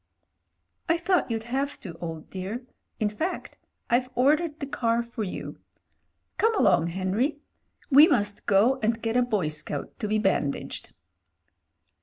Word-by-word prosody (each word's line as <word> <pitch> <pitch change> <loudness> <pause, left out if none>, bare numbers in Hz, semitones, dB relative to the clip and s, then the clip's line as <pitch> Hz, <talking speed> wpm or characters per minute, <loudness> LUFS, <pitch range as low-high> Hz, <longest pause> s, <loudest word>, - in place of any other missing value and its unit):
"I 335 - +4
thought 355 -1 +1
you'd 225 -1 -2
have 270 +4 -2
to, 175 - -7
old 165 -2 -6
dear. 200 +7 -5 0.3
In 215 - +2
fact, 315 - -4 0.3
I've 250 +1 +2
ordered 300 +4 +2
the 280 - -3
car 235 -3 0
for 235 -2 -5
you. 185 - -6 0.8
Come 450 +1 +3
along, 170 - +4
Henry 190 - 0 0.3
— - - -34
we 290 +4 +9
must 205 - 0
go 220 +7 +4
and 225 +1 +1
get 225 0 -2
a 250 - +5
boy 210 -10 0
scout 150 -1 -5
to 215 - -2
be 215 +1 +1
bandaged." 195 -9 -1
230 Hz, 150 wpm, -26 LUFS, 195-275 Hz, 0.8 s, we